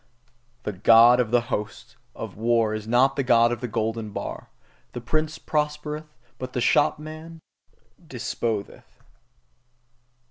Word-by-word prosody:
The - - -2
God 115 +5 +6
of 120 -3 +1
the 120 0 +1
Hosts 105 +1 -5 0.2
of - - -7
war 115 0 +1
is 110 0 -5
not 130 +4 +3
the 140 - 0
God 120 -2 +4
of 120 -1 -3
the 125 - -3
golden 110 0 -2
bar; - - -6 0.4
the - - -4
prince 155 +5 -2
proposeth, 150 -1 -3 0.2
but 130 0 -6
the - - -1
shopman 155 +5 0 0.7
disposeth! 115 -5 -5
120 Hz, 130 wpm, -24 LUFS, 115-150 Hz, 0.7 s, God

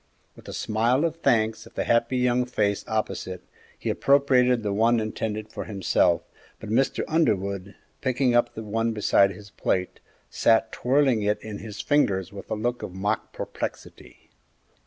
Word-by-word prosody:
With - - -16
a - - -6
smile 120 +7 +1
of 165 0 -2
thanks 110 -7 +1
at - - -19
the - - 0
happy 115 +2 +2
young 125 0 +2
face 105 -5 0
opposite, 95 -4 -3 0.3
he - - -2
appropriated 125 -4 +3
the 100 -1 -1
one 115 +3 +3
intended 110 0 -3
for - - -5
himself, 95 -4 +1 0.4
but 110 - -7
Mr. 130 +4 +1
Underwood, 100 - 0 0.3
picking 130 -1 +1
up 120 0 +2
the 110 - -5
one 115 +2 -1
beside 100 -2 +4
his 100 +1 -11
plate, 90 -2 -2 0.3
sat 115 0 +2
twirling 130 -3 +2
it 105 +1 0
in 105 -2 -6
his 105 -2 -7
fingers 100 - +1
with 100 - -9
a - - -1
look 120 +3 -2
of 90 - -7
mock 100 +2 -2
perplexity. - - -7
110 Hz, 160 wpm, -25 LUFS, 100-125 Hz, 0.4 s, beside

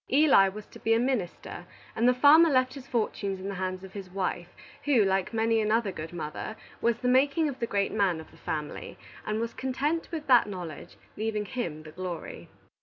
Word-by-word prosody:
Eli 270 -9 +6
was 210 +2 -9
to - - -14
be 225 0 +2
a - - +3
minister, 240 -8 -3 0.3
and 235 +3 +4
the - - +5
farmer 300 +6 +7
left 255 -2 +2
his 270 -1 -10
fortunes 205 -4 -1
in 190 - -6
the - - -3
hands 185 0 -3
of 190 0 -11
his 195 -3 -7
wife, 180 -2 -2 0.4
who, 255 -8 +4
like 190 -1 0
many 225 0 +2
another 215 -1 +1
good 160 -2 -7
mother, 170 +5 -5 0.3
was 235 -1 +2
the 250 - -2
making 280 +5 +3
of 275 -3 -5
the 235 - -1
great 200 -2 0
man 195 -6 +1
of 160 - -12
the - - -18
family, 150 -1 -5 0.3
and 215 +1 -1
was 230 0 -3
content 285 +5 -2
with 320 -3 -5
that 245 -5 +5
knowledge, 175 -6 -7 0.2
leaving 215 -1 -1
him 170 -9 -4
the 155 - -11
glory. 180 0 -6
215 Hz, 205 wpm, -28 LUFS, 185-255 Hz, 0.4 s, farmer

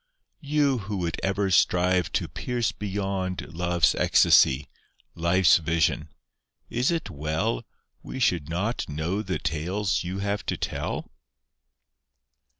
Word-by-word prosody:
You 145 -3 +1
who 100 0 -4
would 85 -2 -2
ever 95 0 0
strive 90 -1 +3
to - - 0
pierce 120 -4 -2
beyond 95 -4 -3
Love's 85 0 +2
ecstacy, 65 +2 +4 0.5
Life's 85 +2 +4
vision, 80 -1 0 0.6
is 125 +2 +1
it 165 -1 -2
well 75 -4 -2 0.3
We 130 - -7
should 85 - +1
not 95 +7 -2
know 80 +7 -2
the 95 -3 -2
tales 90 +5 -1
you 90 +2 -4
have 100 +1 -2
to - - -1
tell? - - -4
95 Hz, 120 wpm, -26 LUFS, 85-105 Hz, 0.6 s, ecstacy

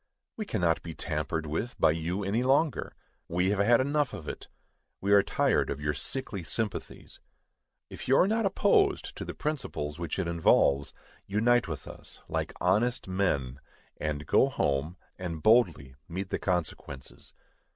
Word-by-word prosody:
We 215 -2 -5
cannot 85 -6 +1
be 80 -2 -8
tampered 80 0 -2
with 80 +11 -3
by - - +5
you 85 +5 -2
any 100 +5 0
longer. 135 +2 +1 0.3
We 90 +3 +1
have 100 - 0
had 115 +4 +5
enough 140 -1 +1
of 75 - -8
it. - - -6 0.5
We 100 +1 +2
are 100 - +8
tired - - +1
of 70 - -3
your 75 0 -1
sickly 110 - -4
sympathies. 105 +5 -4 0.7
If - - -9
you 135 - +5
are 185 - +5
not 220 0 +2
opposed 375 - +2
to - - -4
the - - -6
principles 105 - -3
which 85 -3 -3
it 95 -3 -1
involves, 70 -4 +3 0.4
unite 115 +4 +3
with 80 -4 -6
us, - - -9
like - - -2
honest 110 +8 +1
men, 70 -9 0 0.4
and 75 -1 -3
go 135 - +4
home, 75 - -1 0.2
and 85 -4 -5
boldly 85 - +3 0.2
meet 95 +3 -4
the - - -2
consequences. 80 -7 -4
95 Hz, 160 wpm, -29 LUFS, 80-120 Hz, 0.7 s, are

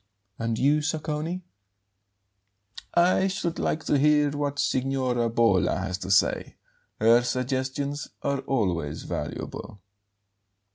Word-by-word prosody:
"And 115 -1 -1
you, 145 +5 +3
Sacconi?" 155 +3 -2 1.5
"I 180 +2 +4
should 185 -3 -2
like 160 - -1
to 145 - +2
hear 150 0 +4
what 145 0 -2
Signora 130 -3 0
Bolla 110 -5 +3
has 95 0 -3
to 95 - -6
say. 95 - +2 0.4
Her 115 +2 +6
suggestions 130 +3 -2 0.2
are 140 -1 0
always 95 - -1
valuable." 100 - -5
135 Hz, 105 wpm, -26 LUFS, 115-150 Hz, 1.5 s, Her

